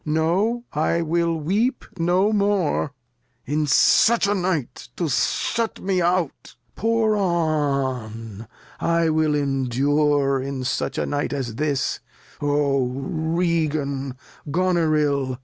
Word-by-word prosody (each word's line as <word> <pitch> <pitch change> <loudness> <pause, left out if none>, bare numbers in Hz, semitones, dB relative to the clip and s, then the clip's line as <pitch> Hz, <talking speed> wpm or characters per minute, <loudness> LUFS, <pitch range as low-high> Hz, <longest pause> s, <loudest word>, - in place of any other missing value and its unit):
No, 175 +10 0
I 165 +3 +1
will 165 -1 0 0.5
no 180 +5 +2
more; 200 -8 +1 0.5
in 150 +2 0
such 220 - +4
a 200 - +2
Night 180 -10 -2
To 170 - -1
shut 225 - 0
me 190 -2 0
out 175 -3 -1 0.2
Pour 225 -1 +1
on, 135 - -1 0.3
I 170 -1 +2
wiU 155 -1 +2
endure 140 +1 +1
In 135 -1 -4
such 130 - -2
a - - 0
Night 145 0 -2
as 130 -5 -3
this: 145 +2 -1 0.4
O 145 -3 +1
Regan, 155 -1 -1 0.3
Goneril 155 -6 +1
155 Hz, 105 wpm, -23 LUFS, 140-175 Hz, 0.5 s, such